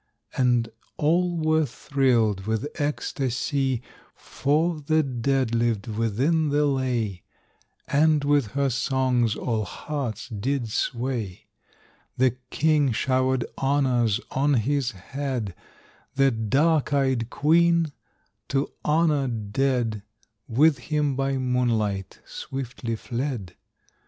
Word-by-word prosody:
And 120 Hz, -3 st, +2 dB, 0.3 s
all 175 Hz, +3 st, +2 dB
were 155 Hz, 0 st, +2 dB
thrilled 115 Hz, -7 st, +1 dB
with 110 Hz, +4 st, -1 dB, 0.2 s
ecstasy, 135 Hz, -2 st, -1 dB, 0.3 s
For 155 Hz, +4 st, 0 dB
the 155 Hz, +1 st, +2 dB
dead 130 Hz, -1 st, 0 dB
lived 115 Hz, -3 st, +1 dB
within 120 Hz, +9 st, 0 dB
the 145 Hz, +1 st, +2 dB
lay, 125 Hz, -9 st, -1 dB, 0.7 s
And 150 Hz, 0 st, +3 dB
with 145 Hz, -4 st, +2 dB
her 140 Hz, -1 st, +1 dB
songs 125 Hz, -2 st, +1 dB
all 110 Hz, -3 st, -1 dB
hearts 135 Hz, 0 st, -5 dB
did 120 Hz, +3 st, -2 dB
sway. 120 Hz, -6 st, -2 dB, 0.7 s
The 130 Hz, 0 st, +4 dB, 0.2 s
king 150 Hz, -3 st, +2 dB
showered 130 Hz, +2 st, +1 dB
honors 130 Hz, -6 st, +2 dB
on 140 Hz, +2 st, +2 dB
his 130 Hz, +2 st, +1 dB
head; 120 Hz, 0 st, -4 dB, 0.6 s
The 135 Hz, 0 st, +4 dB
dark 135 Hz, +8 st, +1 dB
eyed 130 Hz, -4 st, +1 dB
queen, 165 Hz, +2 st, +3 dB, 0.6 s
to 140 Hz, +1 st, -1 dB
honor 150 Hz, -3 st, +2 dB
dead, 115 Hz, 0 st, -1 dB, 0.5 s
With 140 Hz, +4 st, +4 dB
him 150 Hz, -3 st, +1 dB
by 135 Hz, 0 st, 0 dB
moonlight 115 Hz, -6 st, -1 dB
swiftly 125 Hz, -3 st, -5 dB
fled. 120 Hz, -6 st, -4 dB
130 Hz, 100 wpm, -25 LUFS, 115-145 Hz, 0.7 s, The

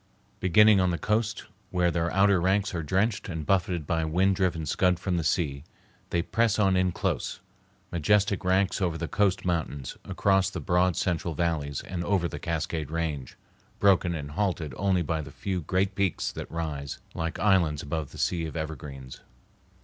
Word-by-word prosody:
Beginning 105 Hz, +3 st, +6 dB
on 90 Hz, -1 st, +3 dB
the 85 Hz, -, 0 dB
coast, 105 Hz, +2 st, -1 dB, 0.2 s
where 90 Hz, -2 st, +2 dB
their 85 Hz, 0 st, 0 dB
outer 95 Hz, -1 st, +4 dB
ranks 100 Hz, +3 st, +1 dB
are 85 Hz, -, -2 dB
drenched 100 Hz, +8 st, 0 dB
and 80 Hz, -3 st, -4 dB
buffeted 90 Hz, -3 st, +1 dB
by 80 Hz, +1 st, 0 dB
wind 90 Hz, +5 st, +2 dB
driven 90 Hz, -4 st, 0 dB
scud 90 Hz, +4 st, +2 dB
from 90 Hz, 0 st, -1 dB
the 85 Hz, -, -1 dB
sea, 75 Hz, -4 st, 0 dB, 0.5 s
they 85 Hz, -, 0 dB
press 115 Hz, +1 st, +1 dB
on 100 Hz, -3 st, +3 dB
in 95 Hz, 0 st, +2 dB
close, 85 Hz, -, -2 dB, 0.5 s
majestic 100 Hz, +4 st, +2 dB
ranks 95 Hz, +2 st, +2 dB
over 85 Hz, -3 st, 0 dB
the 80 Hz, -, -3 dB
coast 100 Hz, -1 st, +1 dB
mountains, 80 Hz, -6 st, -2 dB
across 95 Hz, -1 st, +2 dB
the 90 Hz, -, -5 dB
broad 90 Hz, +3 st, +2 dB
central 85 Hz, -2 st, -1 dB
valleys, 75 Hz, -4 st, -1 dB
and 90 Hz, -2 st, -5 dB
over 95 Hz, -2 st, +1 dB
the -, -, -7 dB
Cascade 80 Hz, -2 st, -2 dB
Range, 75 Hz, -5 st, -3 dB, 0.4 s
broken 95 Hz, -3 st, +3 dB
and 70 Hz, -2 st, -5 dB
halted 85 Hz, -5 st, -1 dB
only 95 Hz, -1 st, +1 dB
by 80 Hz, 0 st, -1 dB
the -, -, -9 dB
few 95 Hz, -3 st, -3 dB
great 95 Hz, +5 st, 0 dB
peaks 95 Hz, -3 st, 0 dB
that -, -, -7 dB
rise 75 Hz, -4 st, -4 dB, 0.2 s
like 85 Hz, +1 st, -3 dB
islands 85 Hz, -8 st, +2 dB
above 75 Hz, 0 st, -3 dB
the -, -, -11 dB
sea 85 Hz, -2 st, 0 dB
of 80 Hz, -, -6 dB
evergreens. 70 Hz, -4 st, -6 dB
85 Hz, 175 wpm, -27 LUFS, 80-95 Hz, 0.5 s, Beginning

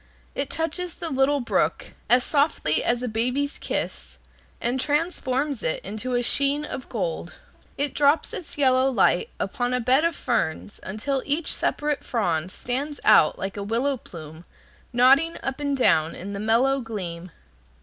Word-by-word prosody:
It 275 Hz, 0 st, -2 dB
touches 330 Hz, +2 st, -3 dB
the 330 Hz, -, -5 dB
little 270 Hz, +1 st, +2 dB
brook 240 Hz, -, 0 dB, 0.2 s
as 245 Hz, +1 st, +5 dB
softly 280 Hz, -, +1 dB
as 240 Hz, +1 st, 0 dB
a -, -, -1 dB
baby's 250 Hz, +6 st, -1 dB
kiss, -, -, -4 dB, 0.4 s
and 245 Hz, +3 st, -1 dB
transforms 290 Hz, -3 st, 0 dB
it 160 Hz, -, -1 dB
into 220 Hz, +6 st, -3 dB
a 245 Hz, -, +1 dB
sheen 280 Hz, +4 st, +2 dB
of 260 Hz, -, -7 dB
gold. -, -, -3 dB, 0.4 s
It 285 Hz, 0 st, -1 dB
drops 290 Hz, +2 st, +2 dB
its 325 Hz, -, -6 dB
yellow 260 Hz, -1 st, +4 dB
light 355 Hz, -, +2 dB
upon 245 Hz, 0 st, -1 dB
a -, -, 0 dB
bed 255 Hz, +5 st, +3 dB
of 335 Hz, 0 st, +1 dB
ferns 205 Hz, -6 st, -2 dB
until 255 Hz, +8 st, -2 dB
each 300 Hz, +3 st, 0 dB
separate 295 Hz, -1 st, -1 dB
frond 175 Hz, -, -1 dB
stands 280 Hz, +7 st, -3 dB
out 155 Hz, -, +5 dB
like 195 Hz, +1 st, -5 dB
a -, -, -3 dB
willow 240 Hz, +7 st, 0 dB
plume 160 Hz, -, -11 dB, 0.5 s
nodding 270 Hz, +7 st, +4 dB
up 270 Hz, +1 st, -3 dB
and 285 Hz, -1 st, -1 dB
down 160 Hz, -10 st, +3 dB
in 200 Hz, +3 st, -7 dB
the 200 Hz, -, -4 dB
mellow 240 Hz, +6 st, +2 dB
gleam. 185 Hz, -6 st, -6 dB
255 Hz, 160 wpm, -24 LUFS, 225-285 Hz, 0.5 s, as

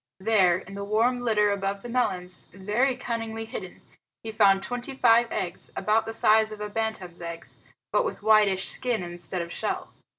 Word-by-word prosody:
There, 190 Hz, -4 st, +4 dB
in 190 Hz, +1 st, -11 dB
the 200 Hz, 0 st, -5 dB
warm 225 Hz, +5 st, +1 dB
litter 210 Hz, -3 st, +2 dB
above 195 Hz, 0 st, -2 dB
the -, -, -6 dB
melons, 185 Hz, -8 st, -1 dB
very 210 Hz, +8 st, 0 dB
cunningly 225 Hz, -3 st, -4 dB
hidden, 225 Hz, -, -8 dB, 0.4 s
he 225 Hz, -, -5 dB
found 200 Hz, -3 st, +4 dB
twenty 245 Hz, +2 st, -5 dB
five 235 Hz, -2 st, +4 dB
eggs, 175 Hz, -2 st, -4 dB
about 215 Hz, +3 st, +1 dB
the 225 Hz, -, -4 dB
size 220 Hz, 0 st, +4 dB
of 215 Hz, -, -8 dB
a 210 Hz, 0 st, -4 dB
bantam's 205 Hz, -6 st, -4 dB
eggs, 170 Hz, -1 st, -8 dB, 0.3 s
but -, -, +3 dB
with 485 Hz, -, -5 dB
whitish 210 Hz, -3 st, +4 dB
skin 245 Hz, -7 st, -1 dB
instead 175 Hz, +1 st, -4 dB
of 170 Hz, -, -9 dB
shell. -, -, -3 dB
215 Hz, 175 wpm, -26 LUFS, 190-230 Hz, 0.4 s, There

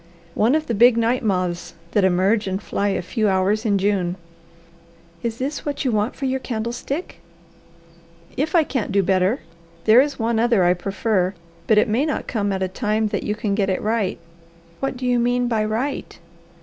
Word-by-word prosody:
"One 230 Hz, -, +3 dB
of 310 Hz, 0 st, 0 dB
the 235 Hz, -, -2 dB
big 235 Hz, +2 st, +5 dB
night 235 Hz, +2 st, +1 dB
moths 180 Hz, -4 st, -1 dB, 0.2 s
that 205 Hz, -, +2 dB
emerge 190 Hz, +4 st, +2 dB
and 190 Hz, 0 st, -1 dB
fly 200 Hz, 0 st, -2 dB
a 195 Hz, -2 st, -1 dB
few 215 Hz, +3 st, 0 dB
hours 195 Hz, +4 st, +1 dB
in 200 Hz, -2 st, +3 dB
June." 190 Hz, -3 st, 0 dB, 1.1 s
"Is 230 Hz, -1 st, -3 dB
this 280 Hz, +4 st, -3 dB
what 285 Hz, -1 st, -3 dB
you 255 Hz, -, +2 dB
want 215 Hz, +1 st, 0 dB
for 275 Hz, -, -4 dB
your 265 Hz, 0 st, 0 dB
candlestick?" 240 Hz, +7 st, -4 dB, 1.2 s
"If 305 Hz, +5 st, -1 dB
I 330 Hz, -, +6 dB
can't 255 Hz, -8 st, -3 dB
do 200 Hz, 0 st, +3 dB
better. 190 Hz, +6 st, +1 dB, 0.4 s
There 225 Hz, +3 st, +7 dB
is 285 Hz, 0 st, -2 dB
one 225 Hz, -1 st, 0 dB
other 230 Hz, -4 st, +3 dB
I 175 Hz, 0 st, +4 dB
prefer, 190 Hz, +1 st, -1 dB, 0.3 s
but 220 Hz, -, +4 dB
it 210 Hz, -, +4 dB
may 225 Hz, +6 st, +1 dB
not 300 Hz, -, -2 dB
come 205 Hz, -4 st, -1 dB
at 190 Hz, -1 st, -1 dB
a -, -, 0 dB
time 215 Hz, +2 st, -1 dB
that -, -, -2 dB
you 210 Hz, -, -2 dB
can 210 Hz, -1 st, -2 dB
get 200 Hz, -1 st, +1 dB
it 185 Hz, -, 0 dB
right." 215 Hz, -3 st, -1 dB, 0.6 s
"What 270 Hz, -1 st, -2 dB
do 255 Hz, -, -5 dB
you 245 Hz, -1 st, +2 dB
mean 245 Hz, +1 st, +1 dB
by 225 Hz, -3 st, +1 dB
'right'?" 230 Hz, +7 st, -3 dB
220 Hz, 195 wpm, -22 LUFS, 195-245 Hz, 1.2 s, There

